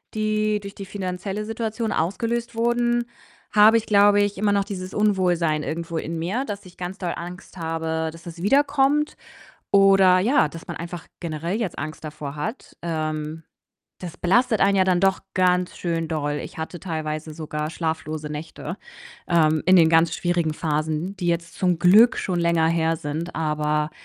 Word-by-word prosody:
die 215 Hz, 0 st, +1 dB
durch 200 Hz, 0 st, -9 dB
die 195 Hz, -, -7 dB
finanzielle 195 Hz, +1 st, -4 dB
Situation 225 Hz, 0 st, -3 dB
ausgelöst 230 Hz, +7 st, -1 dB
wurden, 240 Hz, +1 st, +1 dB, 0.5 s
habe 215 Hz, +2 st, +7 dB
ich, 225 Hz, -, -2 dB
glaube 205 Hz, 0 st, +5 dB
ich, 205 Hz, -1 st, 0 dB
immer 205 Hz, +1 st, +2 dB
noch 200 Hz, -1 st, +2 dB
dieses 185 Hz, -2 st, -6 dB
Unwohlsein 180 Hz, -7 st, +2 dB
irgendwo 165 Hz, +1 st, -4 dB
in 165 Hz, +1 st, -3 dB
mir, 205 Hz, +12 st, -1 dB
dass 205 Hz, -3 st, -6 dB
ich 180 Hz, -, -15 dB
ganz 180 Hz, +2 st, -5 dB
doll 180 Hz, -3 st, -2 dB
Angst 180 Hz, +2 st, -9 dB
habe, 160 Hz, -1 st, -2 dB
dass 165 Hz, +1 st, -14 dB
es 170 Hz, 0 st, -8 dB
wiederkommt 285 Hz, +4 st, +2 dB, 0.6 s
oder 195 Hz, -2 st, +6 dB
ja, 210 Hz, -, +3 dB
dass 165 Hz, +2 st, -10 dB
man -, -, -6 dB
einfach 170 Hz, 0 st, -7 dB
generell 170 Hz, +4 st, -3 dB
jetzt 195 Hz, -7 st, -3 dB
Angst 155 Hz, +2 st, -6 dB
davor 150 Hz, -1 st, -6 dB
hat. 155 Hz, -, -6 dB
Ähm, 155 Hz, -1 st, -3 dB, 0.6 s
das 175 Hz, -2 st, -8 dB
belastet 220 Hz, +5 st, +2 dB
einen 195 Hz, 0 st, +4 dB
ja 190 Hz, -, +5 dB
dann 185 Hz, -1 st, +2 dB
doch 195 Hz, 0 st, +3 dB, 0.2 s
ganz 180 Hz, -1 st, +2 dB
schön 165 Hz, -2 st, -2 dB
doll. 150 Hz, -2 st, -2 dB
Ich -, -, -10 dB
hatte 160 Hz, +2 st, -5 dB
teilweise 155 Hz, -2 st, -4 dB
sogar 150 Hz, -1 st, -4 dB
schlaflose 155 Hz, -2 st, -3 dB
Nächte, 160 Hz, +3 st, -6 dB, 0.5 s
ähm, 155 Hz, -3 st, +3 dB
in 185 Hz, -, +7 dB
den 165 Hz, -3 st, +6 dB
ganz 165 Hz, 0 st, +4 dB
schwierigen 175 Hz, -3 st, 0 dB
Phasen, 155 Hz, +5 st, -2 dB
die 180 Hz, -1 st, -3 dB
jetzt 170 Hz, 0 st, -1 dB
zum 180 Hz, -2 st, +1 dB
Glück 215 Hz, +8 st, +6 dB
schon 180 Hz, -2 st, -1 dB
länger 170 Hz, -1 st, +2 dB
her 165 Hz, 0 st, +1 dB
sind. 155 Hz, +4 st, -5 dB
Aber 150 Hz, -1 st, 0 dB
175 Hz, 170 wpm, -23 LUFS, 160-205 Hz, 0.6 s, habe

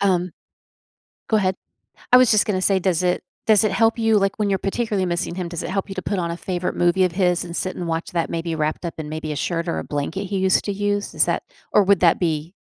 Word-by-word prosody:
um 180 Hz, -3 st, +1 dB, 1.0 s
go 220 Hz, -, +4 dB
ahead. 190 Hz, -2 st, +1 dB, 0.6 s
I -, -, +10 dB
was 255 Hz, -2 st, +6 dB
just 215 Hz, -1 st, +4 dB
gonna 185 Hz, -3 st, -1 dB
say, 195 Hz, 0 st, +3 dB
does 185 Hz, -1 st, 0 dB
it 180 Hz, 0 st, +1 dB, 0.2 s
does 215 Hz, -1 st, +5 dB
it 215 Hz, -, +1 dB
help 225 Hz, 0 st, +2 dB
you, 225 Hz, -1 st, +3 dB
like, 195 Hz, +1 st, 0 dB
when 210 Hz, -, +1 dB
you're 195 Hz, -, +1 dB
particularly 200 Hz, -2 st, -1 dB
missing 175 Hz, 0 st, -2 dB
him, 180 Hz, -1 st, -4 dB
does 170 Hz, -1 st, -5 dB
it -, -, -4 dB
help 195 Hz, +1 st, -2 dB
you 195 Hz, -, -6 dB
to 185 Hz, -, -3 dB
put 200 Hz, -, -2 dB
on 170 Hz, -1 st, -2 dB
a 170 Hz, -, -3 dB
favorite 180 Hz, 0 st, -3 dB
movie 175 Hz, +2 st, +3 dB
of 180 Hz, -, 0 dB
his 180 Hz, -1 st, +1 dB
and 170 Hz, 0 st, -7 dB
sit 185 Hz, -, -2 dB
and 175 Hz, -, -5 dB
watch 165 Hz, 0 st, -3 dB
that 170 Hz, -2 st, -1 dB
maybe 165 Hz, 0 st, -2 dB
wrapped 155 Hz, +2 st, -2 dB
up 170 Hz, -, -4 dB
in 155 Hz, -1 st, -5 dB
maybe 155 Hz, 0 st, -4 dB
a -, -, -4 dB
shirt 165 Hz, +3 st, -2 dB
or 80 Hz, -, -1 dB
a 80 Hz, -, -4 dB
blanket 160 Hz, +7 st, -3 dB
he 195 Hz, 0 st, -2 dB
used 190 Hz, 0 st, +2 dB
to 205 Hz, -, -1 dB
use? 205 Hz, 0 st, -2 dB
Is -, -, +4 dB
that -, -, -1 dB, 0.3 s
or 210 Hz, -, +6 dB
would 195 Hz, -1 st, +3 dB
that 170 Hz, -2 st, +4 dB
be 165 Hz, 0 st, -1 dB
185 Hz, 270 wpm, -22 LUFS, 170-200 Hz, 1.0 s, I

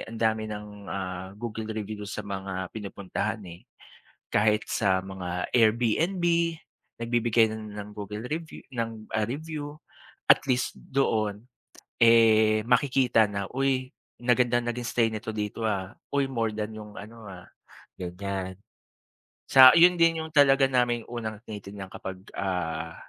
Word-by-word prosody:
ang 115 Hz, 0 st, -7 dB
dami 110 Hz, -1 st, +1 dB
ng 105 Hz, 0 st, -6 dB, 0.2 s
ah, 95 Hz, -1 st, -4 dB
Google 110 Hz, 0 st, -5 dB
review 105 Hz, -1 st, -5 dB
sa 110 Hz, -, -4 dB
mga 95 Hz, -2 st, -4 dB
pinupuntahan, 105 Hz, +1 st, -4 dB
eh. 85 Hz, +1 st, -12 dB, 0.7 s
Kahit 105 Hz, 0 st, +2 dB
sa 95 Hz, -3 st, +2 dB
mga 90 Hz, -2 st, -4 dB
AirBNB, 125 Hz, -, +2 dB, 0.8 s
nagbibigay 115 Hz, -1 st, +3 dB
na -, -, -4 dB, 0.3 s
ng 105 Hz, -, -12 dB
Google 105 Hz, +2 st, -6 dB
review 160 Hz, +2 st, -5 dB
ng 115 Hz, -3 st, -4 dB
ah, 110 Hz, -, +2 dB
review. 150 Hz, +2 st, -5 dB, 0.5 s
At -, -, +7 dB
least 125 Hz, -2 st, 0 dB
doon 110 Hz, -5 st, -1 dB, 0.6 s
eh, 110 Hz, -2 st, +6 dB
makikita 125 Hz, -3 st, +3 dB
na, 100 Hz, -1 st, -3 dB
"Uy 130 Hz, -1 st, 0 dB, 0.3 s
maganda 120 Hz, 0 st, +3 dB
naging 120 Hz, 0 st, -3 dB
stay 115 Hz, -2 st, +3 dB
nito 110 Hz, 0 st, -5 dB
dito 105 Hz, +1 st, -4 dB
ah", 95 Hz, -2 st, -3 dB, 0.2 s
"Uy 140 Hz, -1 st, +2 dB
more 115 Hz, -4 st, 0 dB
than 105 Hz, 0 st, -4 dB
yung 105 Hz, -1 st, -10 dB
ano 110 Hz, +1 st, -11 dB
ah," 90 Hz, -2 st, -11 dB, 0.5 s
ganyan. 95 Hz, +1 st, -4 dB, 1.0 s
Sa 130 Hz, -1 st, +11 dB
yun 175 Hz, +1 st, +7 dB
din 165 Hz, -1 st, +4 dB
yung 160 Hz, -, -9 dB
talaga 135 Hz, -2 st, +6 dB
naming 120 Hz, -2 st, +2 dB
unang 110 Hz, -3 st, -5 dB
tinitingnan 100 Hz, -2 st, -8 dB
kapag, 95 Hz, -1 st, -7 dB
ah, 80 Hz, -4 st, -2 dB
110 Hz, 135 wpm, -27 LUFS, 100-125 Hz, 1.0 s, Sa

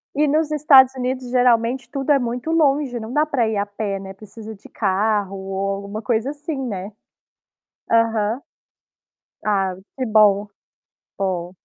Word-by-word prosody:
E 300 Hz, +1 st, +2 dB
nos 310 Hz, +1 st, +1 dB
Estados 275 Hz, -4 st, +6 dB
Unidos, 255 Hz, 0 st, -3 dB
geralmente 245 Hz, 0 st, +2 dB
tudo 275 Hz, +1 st, -1 dB
é 280 Hz, -, +5 dB
muito 245 Hz, +5 st, -3 dB
longe, 285 Hz, -5 st, +2 dB
não 220 Hz, +1 st, -7 dB
dá 300 Hz, +4 st, +2 dB
para 265 Hz, -7 st, 0 dB
ir 220 Hz, -, -2 dB
a 200 Hz, -, 0 dB
pé, 205 Hz, -1 st, -4 dB
né, 190 Hz, 0 st, -9 dB
precisa 215 Hz, +2 st, -11 dB
de 195 Hz, -, -17 dB
carro 205 Hz, 0 st, 0 dB
ou 195 Hz, 0 st, -3 dB
alguma 200 Hz, +2 st, -6 dB
coisa 235 Hz, +2 st, 0 dB
assim, 295 Hz, +2 st, -5 dB
né. 195 Hz, -2 st, -5 dB, 1.0 s
Aham. 230 Hz, +1 st, +1 dB, 1.0 s
Ah, 195 Hz, -3 st, +1 dB, 0.2 s
que 260 Hz, -, -1 dB
bom. 210 Hz, -2 st, +4 dB, 0.7 s
Bom. 180 Hz, -3 st, -2 dB
230 Hz, 150 wpm, -21 LUFS, 200-265 Hz, 1.0 s, Estados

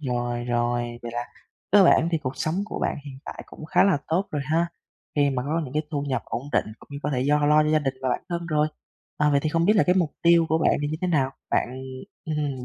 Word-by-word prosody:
Rồi, 120 Hz, -3 st, -2 dB
rồi, 120 Hz, 0 st, -1 dB
vậy 120 Hz, 0 st, -6 dB
là 120 Hz, 0 st, -2 dB, 0.5 s
cơ 200 Hz, -2 st, +8 dB
bản 170 Hz, -1 st, +5 dB
thì 165 Hz, -, +2 dB
cuộc 130 Hz, -2 st, -5 dB
sống 155 Hz, +5 st, -1 dB
của -, -, -6 dB
bạn -, -, -1 dB
hiện 135 Hz, -2 st, -9 dB
tại -, -, -7 dB
cũng -, -, -11 dB
khá 160 Hz, -, +3 dB
là 190 Hz, -7 st, +3 dB
tốt 180 Hz, +5 st, 0 dB
rồi 145 Hz, -2 st, -2 dB
ha. 160 Hz, +3 st, +1 dB, 0.5 s
Khi 145 Hz, -1 st, +3 dB
mà 125 Hz, -2 st, -1 dB
có 155 Hz, +4 st, -1 dB
những 130 Hz, +2 st, -9 dB
cái 155 Hz, -, +1 dB
thu 145 Hz, -2 st, -2 dB
nhập 130 Hz, -4 st, -2 dB
ổn 120 Hz, -, -4 dB
định -, -, +3 dB
cũng -, -, -18 dB
như 140 Hz, -, -5 dB
có 150 Hz, -, -1 dB
thể 130 Hz, -3 st, 0 dB
do 145 Hz, +2 st, +2 dB
lo 150 Hz, +1 st, +5 dB
cho 150 Hz, -, 0 dB
gia 155 Hz, 0 st, +4 dB
đình 135 Hz, -3 st, -2 dB
và 130 Hz, -, 0 dB
bản -, -, -1 dB
thân 170 Hz, -1 st, -3 dB
rồi. 155 Hz, -1 st, +2 dB, 0.5 s
À, 150 Hz, 0 st, +3 dB
vậy 140 Hz, -1 st, +3 dB
thì 155 Hz, -, +1 dB
không 165 Hz, +2 st, +1 dB
biết 205 Hz, -, +5 dB
là 195 Hz, -, +6 dB
cái 180 Hz, -, +4 dB
mục 175 Hz, -5 st, +1 dB
tiêu 170 Hz, -1 st, +5 dB
của 160 Hz, -, +2 dB
bạn -, -, +3 dB
thì 145 Hz, -, 0 dB
như 155 Hz, -, -2 dB
thế -, -, +2 dB
nào? 135 Hz, -5 st, +2 dB, 0.2 s
Bạn, -, -, +1 dB, 0.6 s
ừ 160 Hz, -, -3 dB
hừm, 140 Hz, -4 st, -2 dB
150 Hz, 280 wpm, -25 LUFS, 130-160 Hz, 0.6 s, cơ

